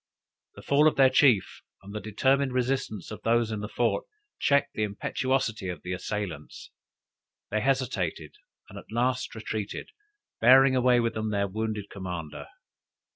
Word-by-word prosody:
The -, -, -12 dB
fall 145 Hz, +2 st, +4 dB
of 155 Hz, -, +2 dB
their 135 Hz, -1 st, +5 dB
chief, 130 Hz, -7 st, +3 dB, 0.2 s
and 100 Hz, +1 st, -10 dB
the 105 Hz, -, -3 dB
determined 130 Hz, +5 st, +1 dB
resistance 125 Hz, -7 st, -2 dB
of 105 Hz, -, -7 dB
those 115 Hz, 0 st, +1 dB
in 110 Hz, -, -3 dB
the 105 Hz, -, -4 dB
fort, -, -, 0 dB, 0.3 s
checked 140 Hz, 0 st, +2 dB
the -, -, -3 dB
impetuosity 110 Hz, 0 st, -1 dB
of 90 Hz, -, -6 dB
the 90 Hz, -, -4 dB
assailants. 90 Hz, -5 st, -5 dB, 0.8 s
They 110 Hz, +1 st, 0 dB
hesitated, 110 Hz, -, -1 dB, 0.3 s
and -, -, -10 dB
at -, -, -16 dB
last 125 Hz, +2 st, -1 dB
retreated, 110 Hz, -2 st, -5 dB, 0.5 s
bearing 130 Hz, +3 st, +6 dB
away 125 Hz, -1 st, +4 dB
with 115 Hz, -1 st, 0 dB
them 110 Hz, 0 st, -2 dB
their 100 Hz, -1 st, 0 dB
wounded 105 Hz, 0 st, -4 dB
commander. 90 Hz, -5 st, -6 dB
110 Hz, 150 wpm, -27 LUFS, 100-130 Hz, 0.8 s, bearing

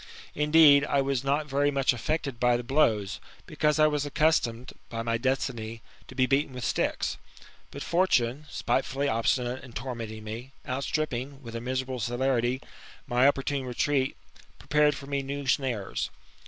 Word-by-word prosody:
Indeed, 150 Hz, -1 st, +6 dB
I 140 Hz, -, +1 dB
was 135 Hz, -2 st, 0 dB
not 145 Hz, +2 st, +1 dB
very 145 Hz, 0 st, +1 dB
much 135 Hz, -2 st, +2 dB
affected 140 Hz, 0 st, -2 dB
by 125 Hz, -1 st, +3 dB
the 120 Hz, -, -5 dB
blows, 115 Hz, -7 st, +1 dB, 0.3 s
because 150 Hz, -1 st, +1 dB
I 155 Hz, -, +6 dB
was 150 Hz, -2 st, +1 dB
accustomed 140 Hz, -5 st, +1 dB, 0.2 s
by 115 Hz, -1 st, -4 dB
my 115 Hz, 0 st, 0 dB
destiny, 120 Hz, -3 st, -2 dB, 0.2 s
to 130 Hz, -, -12 dB
be 130 Hz, -1 st, +3 dB
beaten 135 Hz, +1 st, +1 dB
with 125 Hz, -, -4 dB
sticks. -, -, -1 dB, 0.5 s
But 140 Hz, -, -7 dB
Fortune, 150 Hz, -6 st, +1 dB
spitefully 135 Hz, +1 st, -1 dB
obstinate 125 Hz, +1 st, 0 dB
in 125 Hz, -3 st, -12 dB
tormenting 115 Hz, -4 st, -5 dB
me, 115 Hz, +5 st, -7 dB
outstripping, 135 Hz, 0 st, -2 dB
with 115 Hz, -1 st, -8 dB
a 115 Hz, -, -3 dB
miserable 130 Hz, +1 st, -3 dB
celerity, 120 Hz, +2 st, 0 dB, 0.4 s
my 125 Hz, +2 st, +4 dB
opportune 140 Hz, 0 st, 0 dB
retreat, 130 Hz, -, 0 dB, 0.4 s
prepared 150 Hz, +1 st, +2 dB
for 140 Hz, -, -9 dB
me 140 Hz, 0 st, -1 dB
new 140 Hz, +1 st, -5 dB
snares. 125 Hz, -6 st, -1 dB
135 Hz, 155 wpm, -28 LUFS, 120-145 Hz, 0.5 s, Indeed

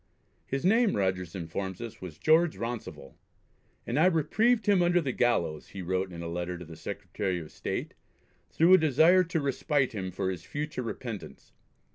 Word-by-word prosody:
His 135 Hz, +4 st, -2 dB
name, 225 Hz, +2 st, +4 dB
Rogers 95 Hz, -3 st, -1 dB
informs 95 Hz, +2 st, -4 dB
us, 115 Hz, -2 st, -8 dB
was 85 Hz, -5 st, -8 dB
George 160 Hz, -, +3 dB
Rounsivell, 115 Hz, -, -6 dB, 0.7 s
and 120 Hz, +5 st, -1 dB
"I 170 Hz, -, +6 dB
reprieved 215 Hz, +7 st, +2 dB
him 200 Hz, -3 st, +4 dB
under 175 Hz, 0 st, +3 dB
the 140 Hz, -6 st, -1 dB
gallows," 115 Hz, -12 st, 0 dB
he 95 Hz, -, -8 dB
wrote 95 Hz, +1 st, -1 dB
in 85 Hz, -1 st, -7 dB
a -, -, -4 dB
letter 90 Hz, +1 st, -3 dB
to 85 Hz, -, -9 dB
the 80 Hz, 0 st, -10 dB
Secretary 95 Hz, 0 st, -4 dB
of 80 Hz, -, -10 dB
State, -, -, -4 dB, 0.6 s
"through 170 Hz, +3 st, +4 dB
a 185 Hz, -, +8 dB
desire 160 Hz, +5 st, +5 dB
to 165 Hz, 0 st, -1 dB
respite 140 Hz, -1 st, 0 dB
him 95 Hz, -3 st, -3 dB
for 95 Hz, +1 st, -2 dB
his 90 Hz, -3 st, -6 dB
future 145 Hz, +5 st, -4 dB
repentance. 115 Hz, -3 st, -7 dB
115 Hz, 175 wpm, -29 LUFS, -, 0.7 s, a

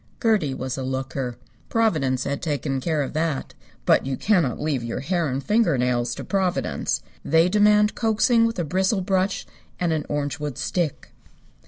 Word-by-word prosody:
Gertie 205 Hz, -, +2 dB
was 130 Hz, 0 st, -4 dB
a -, -, -3 dB
looker. 130 Hz, -1 st, -3 dB, 0.3 s
Providence 150 Hz, -, +1 dB
had 140 Hz, 0 st, -3 dB
taken 145 Hz, -4 st, -2 dB
care 155 Hz, 0 st, 0 dB
of 135 Hz, -, -6 dB
that. 155 Hz, -2 st, -2 dB, 0.3 s
But -, -, +4 dB
you 135 Hz, 0 st, -3 dB
cannot 175 Hz, -, +2 dB
leave 145 Hz, -5 st, -1 dB
your 115 Hz, +2 st, -3 dB
hair 170 Hz, +2 st, 0 dB
and 135 Hz, +1 st, -2 dB
finger 210 Hz, -, +2 dB
nails 120 Hz, -1 st, 0 dB
to -, -, -6 dB
Providence. 190 Hz, -3 st, -1 dB, 0.2 s
They 165 Hz, +3 st, +4 dB
demand 210 Hz, +2 st, +4 dB
coaxing 230 Hz, +1 st, +3 dB
with 230 Hz, -, -4 dB
a 175 Hz, -, 0 dB
bristle 190 Hz, +5 st, +1 dB
brush 190 Hz, +1 st, 0 dB, 0.3 s
and 175 Hz, -2 st, +1 dB
an 155 Hz, -2 st, -2 dB
orangewood 145 Hz, -1 st, -3 dB
stick. 170 Hz, -6 st, -2 dB
155 Hz, 165 wpm, -24 LUFS, 135-190 Hz, 0.3 s, But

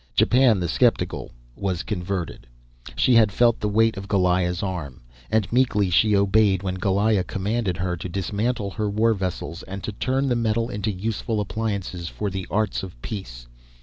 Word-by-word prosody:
Japan 120 Hz, -4 st, +4 dB
the 90 Hz, -, -1 dB
sceptical -, -, +1 dB, 0.3 s
was 95 Hz, -2 st, -2 dB
converted. 90 Hz, -, -4 dB, 0.5 s
She 125 Hz, -, +3 dB
had 110 Hz, -3 st, +5 dB
felt 120 Hz, +2 st, +3 dB
the 105 Hz, -, -1 dB
weight 110 Hz, +1 st, +2 dB
of 100 Hz, +1 st, -6 dB
Goliah's 90 Hz, -2 st, +1 dB
arm. 85 Hz, -9 st, -5 dB, 0.3 s
And 110 Hz, +3 st, 0 dB
meekly 105 Hz, -7 st, +2 dB
she 105 Hz, +4 st, +4 dB
obeyed 100 Hz, -1 st, +3 dB
when 95 Hz, -1 st, -3 dB
Goliah 100 Hz, +1 st, +2 dB
commanded 100 Hz, -1 st, -2 dB
her 90 Hz, -1 st, -1 dB
to 90 Hz, -, -6 dB
dismantle 100 Hz, +4 st, -2 dB
her 105 Hz, +1 st, -2 dB
war 110 Hz, +3 st, +2 dB
vessels 95 Hz, -3 st, -4 dB
and 95 Hz, +1 st, -8 dB
to -, -, -3 dB
turn 130 Hz, +6 st, -1 dB
the 125 Hz, -, +1 dB
metal 115 Hz, +1 st, 0 dB
into 105 Hz, 0 st, -2 dB
useful 110 Hz, +3 st, -2 dB
appliances 100 Hz, -4 st, -3 dB
for 100 Hz, +4 st, -4 dB
the 95 Hz, -1 st, -5 dB
arts 105 Hz, -1 st, 0 dB
of 90 Hz, -10 st, -9 dB
peace. -, -, -6 dB
100 Hz, 170 wpm, -24 LUFS, 95-110 Hz, 0.5 s, had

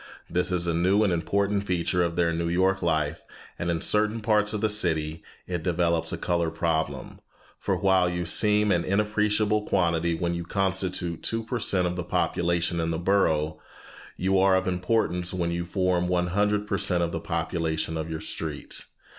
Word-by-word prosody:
This 90 Hz, +1 st, 0 dB
is 90 Hz, -1 st, 0 dB
a 85 Hz, -, 0 dB
new 95 Hz, +5 st, +3 dB
and 100 Hz, -4 st, +2 dB
important 100 Hz, +4 st, 0 dB
feature 90 Hz, 0 st, 0 dB
of 85 Hz, -1 st, 0 dB
their 85 Hz, -1 st, +2 dB
New 85 Hz, 0 st, -1 dB
York 95 Hz, +2 st, +2 dB
life, 80 Hz, -1 st, 0 dB, 0.4 s
and 85 Hz, -, -2 dB
in 85 Hz, -1 st, -1 dB
certain 105 Hz, +2 st, +2 dB
parts 105 Hz, -1 st, +2 dB
of 105 Hz, -, -2 dB
the 110 Hz, -, +2 dB
city 80 Hz, -6 st, 0 dB, 0.2 s
it 90 Hz, -2 st, -3 dB
develops 85 Hz, -2 st, 0 dB
a -, -, -3 dB
color 85 Hz, -2 st, 0 dB
problem, 80 Hz, -4 st, -2 dB, 0.4 s
for 95 Hz, -, -1 dB
while 95 Hz, -2 st, +3 dB
you 90 Hz, 0 st, -3 dB
seem 105 Hz, +3 st, +3 dB
an 85 Hz, -2 st, +2 dB
inappreciable 105 Hz, +1 st, +1 dB
quantity 85 Hz, -2 st, +1 dB
when 85 Hz, +1 st, -1 dB
you 85 Hz, 0 st, -3 dB
constitute 95 Hz, -2 st, -1 dB
two 115 Hz, 0 st, -2 dB
per 120 Hz, +2 st, -3 dB
cent 95 Hz, -4 st, +1 dB
of 90 Hz, 0 st, -1 dB
the 90 Hz, -, -3 dB
population 85 Hz, 0 st, 0 dB
in 80 Hz, 0 st, 0 dB
the 80 Hz, -, -1 dB
borough, 80 Hz, -4 st, +1 dB, 0.6 s
you 95 Hz, +1 st, +2 dB
are 95 Hz, 0 st, +4 dB
of 95 Hz, 0 st, 0 dB
importance 90 Hz, -1 st, 0 dB
when 85 Hz, -2 st, -1 dB
you 85 Hz, 0 st, -2 dB
form 90 Hz, -1 st, 0 dB
one 90 Hz, 0 st, +1 dB
hundred 105 Hz, +1 st, +1 dB
per 100 Hz, -2 st, -1 dB
cent 90 Hz, -3 st, +1 dB
of 85 Hz, -, -1 dB
the 85 Hz, -, -3 dB
population 80 Hz, -1 st, -2 dB
of 80 Hz, 0 st, -4 dB
your 80 Hz, -1 st, -4 dB
street. 80 Hz, -3 st, -5 dB
90 Hz, 190 wpm, -26 LUFS, 85-100 Hz, 0.6 s, are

